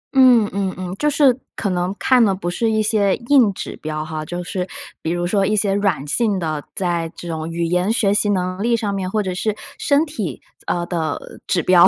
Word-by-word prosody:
嗯 250 -5 +6
嗯 195 -1 -1
嗯， 185 0 -5
就 300 - +2
是 280 -3 +4 0.2
可 200 - -1
能 180 +2 -1
看 255 -2 +4
的 200 -3 +3
不 185 -2 -6
是 225 +6 0
一 220 0 +2
些 210 -3 +2
硬 240 -3 +4
指 - - -6
标 155 0 -3
哈， 155 -1 -4
就 175 +2 -4
是 180 +1 -3 0.3
比 160 - -2
如 175 0 -1
说 195 +2 +2
一 215 - +1
些 205 -1 +1
软 195 -8 0
性 210 +5 +1
的， 155 -4 -2
在 170 -3 -1
这 175 - -8
种 160 -1 -3
语 170 +1 -2
言 180 +4 +1
学 205 -4 +2
习 205 0 +2
能 185 -1 -1
力 235 +1 +2
上 210 -3 -2
面， 190 -2 -2
或 215 +2 0
者 185 -2 -2
是 205 +3 -1 0.2
身 290 +2 +3
体， 210 - -4 0.3
呃 175 -1 0
的 160 -4 -4
指 175 - +2
标。 175 0 +7
190 Hz, 240 characters per minute, -20 LUFS, 175-215 Hz, 0.3 s, 标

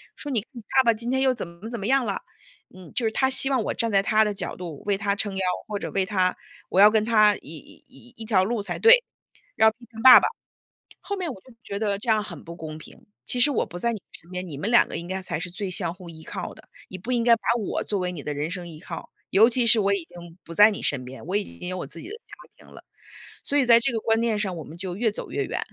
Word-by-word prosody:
说： 290 - -8
“你 225 -5 0
你 245 -4 -10
爸 260 +5 +2
爸 230 - +5
今 230 +2 -4
天 265 +1 +1
又 265 -1 +3
怎 230 - -5
么 170 +6 -10
怎 235 -1 -5
么 200 - -4
样 265 0 +3
了”， 200 -3 -2 0.5
嗯， 185 -3 -13
就 240 - -1
是 220 - +1
她 265 +4 +1
希 270 +1 +4
望 260 -4 +1
我 - - -1
站 230 -1 -1
在 195 -1 +4
她 220 +1 +3
的 210 - -1
角 195 -2 -5
度 170 -5 -8
为 205 -1 +1
她 200 0 0
撑 205 -2 -2
腰， - - -1 0.3
或 210 -1 -4
者 - - -5
为 195 -1 0
她 185 -2 +1 0.3
我 190 - +3
要 210 - +9
跟 215 -1 +2
她 215 -3 +5
一 - - -15
一 135 -5 -13
一 225 - -7
条 200 -4 +3
路 225 +2 -1
才 195 -3 -4
对， 485 +2 +7 0.5
要 220 - +5
批 220 - -18
评 225 -1 -10
爸 260 - +11
爸。 - - +1 0.7
后 405 - -4
面 355 -6 -3
我 195 - -13
就 255 - -18
觉 200 - -5
得 205 -2 -1
这 225 +3 -3
样 215 -1 +3
很 190 -5 -8
不 170 - -9
公 155 -1 -8
平， 235 +8 -14 0.2
其 250 - 0
实 290 - +5
我 275 - 0
不 175 - -10
在 235 +5 0
你 215 - -6 0.2
身 170 - -21
边， 180 0 -4
你 145 - -7
们 200 +9 -2
2 240 - +6
个 - - -5
应 170 - -7
该 190 +1 -3
才 165 - -3
是 180 +1 -3
最 195 +3 -5
相 175 -2 0
互 180 -2 -12
依 160 -1 -12
靠 185 +1 -6
的， - - -17 0.2
你 185 - -8
不 225 +7 -7
应 235 -2 +1
该 235 -1 +6
把 - - -22 0.2
我 205 - -2
作 205 - -1
为 180 0 -2
你 160 -5 -7
的 150 - -4
人 145 +2 -3
生 180 -2 -6
依 160 -2 -11
靠， - - -8 0.2
尤 220 +4 +6
其 245 0 +3
是 225 -1 +7
我 200 0 +2
已 195 -4 -3
经 175 0 -13
不 165 - -9
在 210 +5 +7
你 205 - -5
身 130 -3 0
边， 130 +1 -10
我 185 +3 -1
已 205 - -4
经 180 - -6
有 185 - -4
我 175 - -5
自 150 +4 -9
己 - - -9
的 415 - -6
家 465 - -23 0.3
庭 - - -17
了。 - - -14 0.6
所 285 - -1
以 275 - +4
在 235 -1 +7
这 245 +2 0
个 230 - -1
观 225 +1 +1
念 230 -2 0
上 195 -4 -2
我 160 - -7
们 160 - -11
就 185 -1 -5
越 225 +2 +1
走 210 - -7
越 - - -2
远， - - -3
205 Hz, 315 characters per minute, -24 LUFS, 180-230 Hz, 0.7 s, 爸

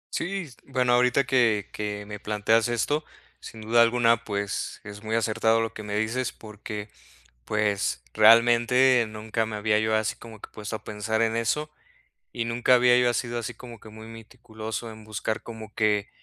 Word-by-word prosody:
Sí, 190 -1 -3 0.2
bueno, 125 -2 +1
ahorita 125 +2 +3
que 115 -5 +2
que 105 -1 -5
me 105 0 -8
planteas 105 +2 +1
esto, 120 +6 0 0.4
sin 110 - -11
duda 115 +2 +3
alguna, 115 0 +3
pues, 100 -2 -3
es 105 -1 -10
muy 110 +1 -2
acertado 115 0 +2
lo 115 0 -2
que - - -8
me 105 -1 -5
dices 115 +4 -1
porque, 105 0 -8 0.6
pues, 100 - -1
realmente 120 +2 +5
nunca 110 +1 -3
me 110 - -6
había 105 0 +1
yo 110 0 +1
así 110 0 0
como 110 -2 -12
que - - -11
puesto 105 +1 -6
a - - -6
pensar 110 +1 -2
en 115 0 +1
eso, 150 +7 -1 0.6
y 115 - -2
nunca 120 +2 +3
había 125 0 +5
yo 125 - +3
asido 120 0 -2
así 120 +1 -5
como 120 0 -12
que 110 - -15
muy 110 +1 -11
meticuloso 110 0 -8
en 110 0 -13
buscar 110 +1 -3
como 110 -2 -10
qué 105 -2 +1
110 Hz, 175 wpm, -26 LUFS, 105-120 Hz, 0.6 s, realmente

